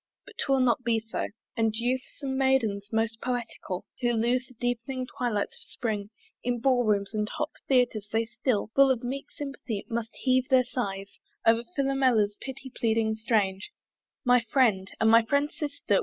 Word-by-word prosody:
But - - -13
'twill 270 -2 +2
not 250 0 +2
be 230 -1 +2
so; 225 0 -3 0.3
And 225 -1 +1
youths 250 +5 -2
and 265 -1 -1
maidens 235 -7 +1
most 225 0 0
poetical 235 -6 -3 0.2
Who 240 -1 +2
lose 240 +3 +1
the 255 - -17
deep'ning 245 +2 -2
twilights 240 -6 -2
of - - -18
the - - -15
spring 210 -5 -2 0.3
In 245 0 0
ball 250 0 +3
rooms 200 -1 +1
and 210 -1 -1
hot 300 - -3 0.2
theatres, 245 -6 +2
they 225 +1 +1
still 235 -1 -1
Full 275 0 +6
of 250 -3 +1
meek 270 +3 -4
sympathy 275 -7 -5
must 230 0 -3
heave 255 0 +1
their 260 -2 +6
sighs 200 -6 -4 0.3
O'er 225 +1 +5
Philomela's 260 -7 +2
pity 265 0 -7
pleading 220 -1 +1
strains. 210 -3 0 0.6
My 250 -1 +5
Friend, 210 -8 +3
and 220 0 +5
my 230 0 +8
Friend's 285 +5 0
Sister! 285 -9 0
235 Hz, 170 wpm, -28 LUFS, 220-260 Hz, 0.6 s, my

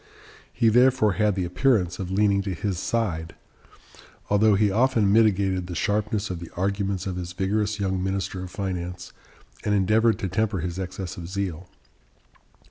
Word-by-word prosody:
He 115 -2 +2
therefore 125 -1 +4
had 105 0 +1
the 95 -2 -1
appearance 90 -1 +1
of 95 -2 -4
leaning 100 0 +2
to 95 -2 -3
his 95 +1 -2
side, 85 -8 -2 1.0
although 105 0 +4
he 105 0 +2
often 110 -2 +3
mitigated 95 -4 +2
the 90 - -6
sharpness 105 +1 -1
of 90 - -4
the 85 - -8
arguments 100 0 -1
of 95 -2 -3
his 90 0 -5
vigorous 105 +3 -1
young 95 -2 -1
minister 95 -1 -2
of 90 - -7
finance 90 -2 -5 0.5
and 105 -1 +1
endeavored 110 +4 +3
to 95 - -3
temper 100 0 -1
his 90 +1 -4
excess 95 0 -5
of 85 -1 -7
zeal. 95 -3 -4
95 Hz, 160 wpm, -25 LUFS, 90-105 Hz, 1.0 s, therefore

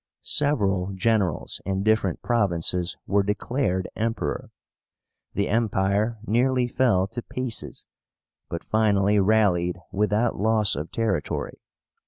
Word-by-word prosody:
Several 100 -10 0
generals 100 -5 0
in 95 +1 -1
different 110 -4 +1
provinces 90 -5 0
were 100 0 +2
declared 105 -1 -1
Emperor. 115 +1 -2 0.9
The 100 - +1
Empire 105 0 +1
nearly 125 +3 +2
fell 120 -7 +2
to 120 +2 -5
pieces, 125 -2 -5 0.6
but 85 - -4
finally 105 -2 +2
rallied 95 -4 +2
without 105 +3 +1
loss 110 -1 +2
of 75 +3 -5
territory. 110 -5 -2
105 Hz, 105 wpm, -25 LUFS, 95-115 Hz, 0.9 s, were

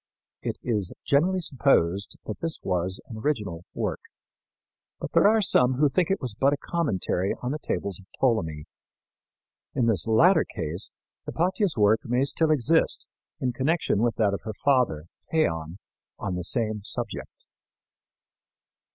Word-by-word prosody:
It - - -3
is 105 -7 -1
generally 180 +7 +2
supposed 105 - +1
that 110 - -5
this 165 -1 -2
was 90 0 0
an 115 - -9
original 105 - -2
work; - - -2 1.0
but - - -5
there - - +5
are 220 0 +4
some 130 -8 +4
who 145 +2 +3
think 170 +5 +1
it 195 - +1
was 125 -5 -4
but 135 +6 +2
a - - -1
commentary 135 - -1
on 125 - -1
the 150 - -3
tables 100 - -3
of 95 - -17
Ptolemy. 80 - 0 1.1
In 125 - +2
this 110 -4 +2
latter 165 +13 +5
case 80 +4 -2 0.4
Hypatia's 185 - 0
work 105 +1 +4
may 125 +2 +1
still 155 +3 +2
exist 155 +2 +2 0.3
in 125 -1 -1
connection 155 - +1
with 115 -1 +1
that 105 -3 +2
of 100 - -3
her 110 -1 -6
father, 125 - +1 0.2
Theon, 80 - 0 0.4
on - - -3
the 90 0 -3
same 110 -1 -1
subject. - - -4
120 Hz, 150 wpm, -26 LUFS, 100-150 Hz, 1.1 s, there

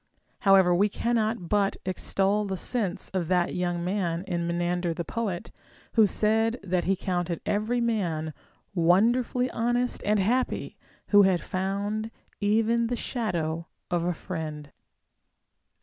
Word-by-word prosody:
However, 190 -3 +5
we 200 +4 +3
cannot 225 -3 -1
but 200 +1 +1
extol 195 +2 +1
the 190 -1 -3
sense 210 -3 -2
of 185 -4 -1
that 180 -1 +1
young 175 -1 -1
man 180 -3 -1
in 175 -3 -2
Me 170 - -1
nander 175 -1 -1
the 170 - -4
poet, 200 -5 -3 0.4
who 220 -3 +6
said 225 +4 +1
that 180 -2 0
he 195 - +2
counted 175 -3 -2
every 215 +4 0
man 175 -10 -1 0.4
wonderfully 230 +8 +3
honest 240 +2 0
and 210 +1 +2
happy 245 +7 0 0.3
who 205 -1 +7
had 190 -3 +4
found 200 +5 -2 0.3
even 225 +3 +2
the 245 - -1
shadow 170 -10 -2 0.2
of 175 -1 +1
a 175 +1 0
friend. 155 -4 -6
195 Hz, 135 wpm, -27 LUFS, 175-220 Hz, 0.4 s, who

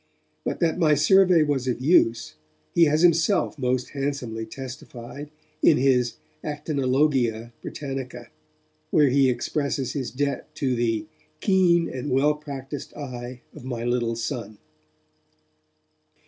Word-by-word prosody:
But - - -3
that 170 +1 +1
my 155 -3 +4
survey 180 +2 +5
was 140 -4 -1
of 125 - -1
use, 115 - +3 0.4
he 170 - +6
has 155 +2 +2
himself 170 -1 +3
most 125 -1 0
handsomely 135 -6 -3
testified 130 +2 -8 0.3
in - - +5
his 125 -2 +2 0.3
Actinologia 135 -5 0
Britannica, 130 -4 -6 0.6
where 145 -3 +4
he 135 0 +4
expresses 130 +1 -1
his 135 -4 -3
debt 140 +1 -3
to 130 -3 0
the 115 -3 0 0.3
'keen 175 -3 +3
and 130 +2 -5
well 140 +4 +3
practised 145 -2 -7
eye 125 -3 -7
of - - -11
my 120 -3 -4
little 120 -1 0
son'. 115 -2 -4
135 Hz, 120 wpm, -25 LUFS, 120-150 Hz, 0.6 s, he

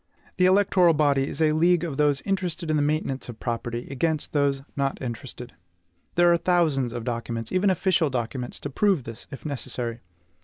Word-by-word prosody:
The 185 0 +5
electoral 185 -3 +4
body 140 -2 +2
is 160 - -1
a 155 - +4
league 170 +2 +3
of 155 -6 -4
those 145 -2 +2
interested 180 -4 -1
in - - +2
the 150 - +2
maintenance 145 -4 -1
of 115 - -8
property, 120 0 -3
against 155 +3 -1
those 140 -2 +1
not 140 -1 -1
interested. 125 - -7 0.6
There 175 0 +5
are - - +4
thousands 160 -9 +1
of 120 -1 -5
documents, 115 -1 -4
even 185 +2 +2
official 185 -3 +2
documents, 125 0 -3
to 145 - -5
prove 190 -2 +2
this, 115 -1 -9
if 135 - -10
necessary. 125 -4 -4
145 Hz, 180 wpm, -25 LUFS, 125-170 Hz, 0.6 s, The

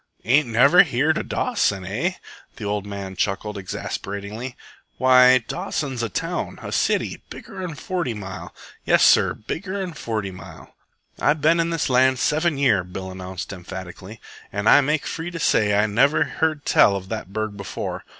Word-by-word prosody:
"Ain't 140 +4 +4
never 140 +10 +6
heered 155 -1 +1
of - - -6
Dawson, 105 - 0
eh?" 125 - -1 0.4
The 115 - -9
old 100 0 -2
man 100 -2 -6
chuckled 105 +2 -2
exasperatingly. 100 +5 -5 0.4
"Why, 130 0 +6
Dawson's 145 -8 -3
a 115 - -2
town, - - -3
a - - -6
city, - - 0
bigger'n 180 -4 -7
Forty 170 -9 -3
Mile. 95 -2 -7 0.3
Yes, - - +4
sir, - - +5
bigger'n 190 - -5
Forty 110 -8 -4
Mile." 95 - -12 0.5
"I've 150 0 +2
ben 165 +3 +4
in 165 0 +1
this 165 -3 -1
land 130 0 +3
seven 155 +3 +1
year," 120 -10 +3
Bill 95 +1 -7
announced 95 0 -7
emphatically, 95 +3 -9 0.3
"an' 100 +1 -3
I 145 - +7
make 150 +2 0
free 165 +1 -4
to 170 -1 -7
say 105 -8 +2
I 105 - +4
never 125 +8 +3
heard 155 -2 -2
tell 100 - +5
of 95 -1 -6
the 110 -1 -3
burg 110 +1 -4
before. 100 -1 -5
115 Hz, 160 wpm, -22 LUFS, 100-150 Hz, 0.5 s, I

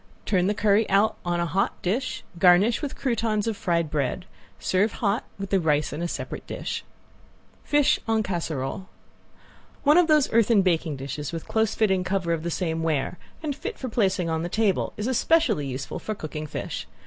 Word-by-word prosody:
Turn 185 -2 +2
the 210 - +1
curry 210 +1 +3
out 200 +3 +3
on 175 0 -1
a 170 - +1
hot 190 +3 0
dish, 220 +9 -1 0.2
garnish 185 +5 +5
with 290 -3 -4
croutons 225 -4 0
of 225 -2 -1
fried 170 -5 0
bread. 145 +3 -1 0.3
Serve 200 +4 +1
hot, 215 0 0
with 195 -1 -6
the 195 - +4
rice 150 -3 +1
in 170 +3 -2
separate - - -6
dish. - - -4 0.8
~FISH 290 -1 +3
EN 220 -1 +2
CASSEROLE~ 170 -1 -3 0.9
One 300 +4 +6
of 350 - +4
those 305 -6 +3
earthen 225 -2 +4
baking 165 -4 +1
dishes 140 +2 -5
with 165 -1 -6
close 220 -1 +1
fitting 190 -4 +2
cover 185 -2 0
of 165 - -2
the 170 - -3
same 165 -1 -1
ware 160 +1 -1 0.2
and 295 -3 -2
fit 435 +9 -6
for 260 - -5
placing 190 -6 +1
on 160 -1 -1
the 175 - -3
table 215 -1 +1
is 210 - -3
especially 255 - +2
useful 130 0 -5
for 215 - -4
cooking 155 -3 -6
fish. - - -5
190 Hz, 185 wpm, -25 LUFS, 165-220 Hz, 0.9 s, One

